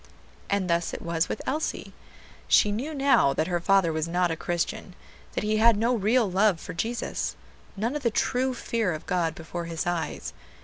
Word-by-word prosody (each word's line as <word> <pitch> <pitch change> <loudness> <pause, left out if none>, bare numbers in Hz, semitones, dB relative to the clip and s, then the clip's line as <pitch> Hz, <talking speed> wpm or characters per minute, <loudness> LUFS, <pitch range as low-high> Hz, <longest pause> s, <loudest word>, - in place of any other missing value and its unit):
And 200 -2 +1
thus 170 0 0
it - - -7
was 170 0 0
with - - -4
Elsie. 305 +4 -3 0.5
She 210 - +5
knew 250 +9 -3
now 270 - +4
that 155 - +1
her 175 0 -1
father 180 -2 +3
was 160 +1 -1
not 175 0 +1
a - - -1
Christian; 175 +4 -3 0.4
that - - -2
he 215 +1 +1
had 225 0 +5
no 230 +3 +2
real 225 +1 +2
love 190 -1 +2
for - - -7
Jesus, 230 +8 -2 0.4
none 230 +7 -1
of 295 - -2
the 240 - +2
true 250 +3 0
fear 225 -6 -1
of 155 - -7
God 170 -4 0
before 170 +1 -6
his 165 -1 -3
eyes. 175 -2 -3
195 Hz, 190 wpm, -26 LUFS, 170-230 Hz, 0.5 s, She